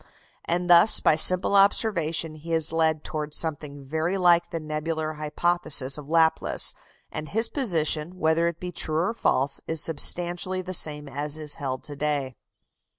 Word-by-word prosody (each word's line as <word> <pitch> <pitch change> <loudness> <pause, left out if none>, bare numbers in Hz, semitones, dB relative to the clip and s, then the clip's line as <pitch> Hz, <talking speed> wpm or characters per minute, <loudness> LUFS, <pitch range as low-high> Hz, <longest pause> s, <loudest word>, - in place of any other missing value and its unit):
And 175 +1 -2
thus, 175 +4 +6
by - - +2
simple 185 +5 +5
observation, 170 -6 0
he 160 +2 -8
is 160 -1 +3
led 160 -1 -1
towards 150 -2 -6
something 145 -3 -4
very 160 +6 -3
like 175 -2 +2
the 165 - -5
nebular 155 0 -5
hypothesis 150 -2 +1
of 150 -1 -7
Laplace; 160 0 +2 0.4
and 155 0 -7
his 225 +2 +1
position, 170 - -1
whether 160 0 0
it 170 -1 -5
be 180 0 -7
true 155 -2 -3
or 180 +7 -1
false, 140 - -1
is 160 0 -1
substantially 175 +3 +1
the 185 +1 -7
same 150 -4 +2
as 145 +2 -3
is 150 -2 -2
held 130 -2 -5
to 145 - -7
day. 140 -3 -3
160 Hz, 160 wpm, -24 LUFS, 150-175 Hz, 0.4 s, thus